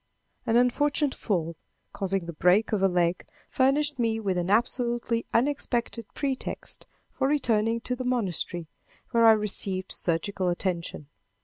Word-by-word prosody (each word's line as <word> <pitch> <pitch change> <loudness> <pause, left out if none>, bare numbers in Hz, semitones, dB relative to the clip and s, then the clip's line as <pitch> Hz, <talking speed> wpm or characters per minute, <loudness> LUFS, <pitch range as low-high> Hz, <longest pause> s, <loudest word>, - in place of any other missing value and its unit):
An 225 - +2
unfortunate 280 +4 +2
fall, 170 -6 -2 0.4
causing 195 -2 -1
the 170 - -6
breaking 180 +8 +3
of 200 - -2
a 195 - +5
leg, 175 -1 +1 0.2
furnished 280 +1 +1
me 225 -1 +1
with 195 -4 -1
an 175 0 -1
absolutely 235 +1 0
unexpected 240 -3 -1
pretext 270 -2 -3 0.2
for 265 - 0
returning 230 -5 +1
to 250 - -2
the 255 - -5
monastery, 190 -8 -1 0.5
where 230 -2 +5
I 225 - +9
received 195 -3 -1
surgical 180 +2 0
attention. 175 -3 -3
225 Hz, 135 wpm, -27 LUFS, 185-250 Hz, 0.5 s, I